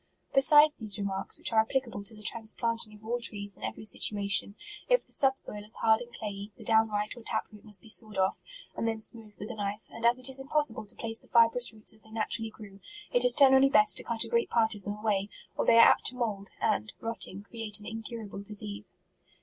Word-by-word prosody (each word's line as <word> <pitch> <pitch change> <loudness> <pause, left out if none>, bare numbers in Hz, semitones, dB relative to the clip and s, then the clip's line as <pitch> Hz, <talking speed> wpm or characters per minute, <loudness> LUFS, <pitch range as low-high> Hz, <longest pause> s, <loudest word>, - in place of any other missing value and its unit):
Besides 295 +2 +6
these 215 -3 0
remarks, 195 -1 +1
which - - -4
are 220 0 +5
applica 260 +1 -2
ble 200 - -7
to 220 +2 -3
the 210 - -14
transplanting 230 0 -1
of 210 +1 -17
all 240 +2 -2
trees 205 -4 0
in - - -16
every - - -6
situation, 200 -1 +2 0.3
if - - +3
the - - -10
subsoil 265 -6 +1
is 215 +2 -2
hard 220 +1 +3
and 240 0 -10
clayey, 205 -2 -7
the - - -12
downright 220 -2 +1
or 240 - -12
tap 220 -1 -3
root 210 -1 -15
must 210 -4 0
be - - -15
sawed 215 -2 +2
off. 190 0 0 0.4
and 230 - -2
then 225 -1 -2
smoothed 220 -1 -6
with 210 - -7
a - - -6
knife; 205 0 -5
and 230 - -10
as 235 +1 +4
it 255 - +2
is 265 0 +1
im 270 - -9
possible 295 -8 -1
to - - -4
place 225 -1 -2
the - - -17
fibrous 235 +1 +4
roots 215 -1 -3
as 220 - +3
they 220 - -16
naturally 225 0 -3
grew, 205 -3 -14 0.3
it - - +3
is - - +4
generally 270 -1 +6
best 215 -5 +4
to - - -5
cut 230 -1 +1
a - - -8
great 470 -1 0
part 225 -1 +1
of 205 - -10
them 205 +1 -5
away, 210 -2 -1 0.3
or - - -2
they 230 - +6
are 230 - +9
apt - - +2
to 250 - -1
mould, 210 -5 -4
and, 105 +1 -1
rotting, 225 -3 -4
create 220 -2 -4
an 210 - -14
incurable 225 -2 -7
dis 205 +1 -3
ease. 105 0 -2
220 Hz, 240 wpm, -29 LUFS, 205-235 Hz, 0.4 s, are